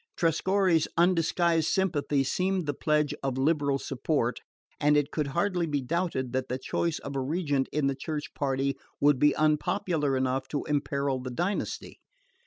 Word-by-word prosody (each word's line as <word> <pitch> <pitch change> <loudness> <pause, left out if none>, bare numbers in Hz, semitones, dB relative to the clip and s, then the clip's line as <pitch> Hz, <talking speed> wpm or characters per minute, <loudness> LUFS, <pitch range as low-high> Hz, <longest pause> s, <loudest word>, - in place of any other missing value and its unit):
Trescorre's 175 0 +2
undisguised 170 -1 +3
sympathy 150 -7 +1
seemed 185 +5 0
the 145 - -1
pledge 150 0 +1
of 135 -2 -2
liberal 140 0 +2
support, 135 -2 -1 0.4
and 150 0 +4
it 145 0 +1
could 150 -3 -1
hardly 175 +3 0
be 145 -2 0
doubted 135 -3 -2
that 130 0 -1
the 125 - -1
choice 160 +5 -1
of 140 0 -7
a - - 0
regent 140 -1 0
in 150 -1 0
the 140 - +2
Church 150 +2 -5
party 135 -1 0 0.2
would 145 -2 +4
be 150 +1 +4
unpopular 155 -1 +1
enough 130 0 -1
to 145 - -3
imperil 140 -2 -1
the 130 0 -5
dynasty. 175 +11 -3
150 Hz, 160 wpm, -28 LUFS, 135-165 Hz, 0.4 s, and